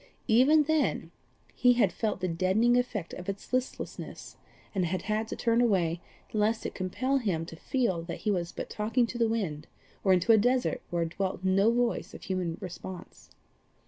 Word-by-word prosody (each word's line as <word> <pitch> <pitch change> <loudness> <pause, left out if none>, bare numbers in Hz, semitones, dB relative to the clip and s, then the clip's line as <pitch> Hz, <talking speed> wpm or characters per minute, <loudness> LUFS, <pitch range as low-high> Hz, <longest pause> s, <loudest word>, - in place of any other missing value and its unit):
Even 270 +7 +5
then 315 0 0 0.4
he 250 -1 +4
had 210 -8 +2
felt 210 -4 -2
the 185 - 0
deadening 190 +8 +2
effect 240 -8 -1
of 180 +1 -6
its 195 +5 -6
listlessness, 255 0 -4 0.4
and 190 -3 +1
had 180 +2 -2
had 215 +1 -1
to - - -4
turn 235 0 +2
away 175 -7 +2 0.3
lest 215 +1 +1
it - - 0
should - - -20
compel 255 +9 -1
him 180 -9 -1
to 165 - -9
feel 230 - -1
that 170 0 -7
he 215 - +1
was 175 -3 -1
but - - -6
talking 225 +4 +1
to 240 +1 -6
the 230 - +4
winds, 170 -10 -2 0.4
or 195 - +4
into 185 +4 +4
a 220 - +7
desert 250 +2 +1
where 170 -1 0
dwelt 185 +2 -3
no 195 +4 +4
voice 240 0 -1
of - - -11
human 180 -3 -2
response. 185 0 -9
210 Hz, 185 wpm, -29 LUFS, 180-240 Hz, 0.4 s, a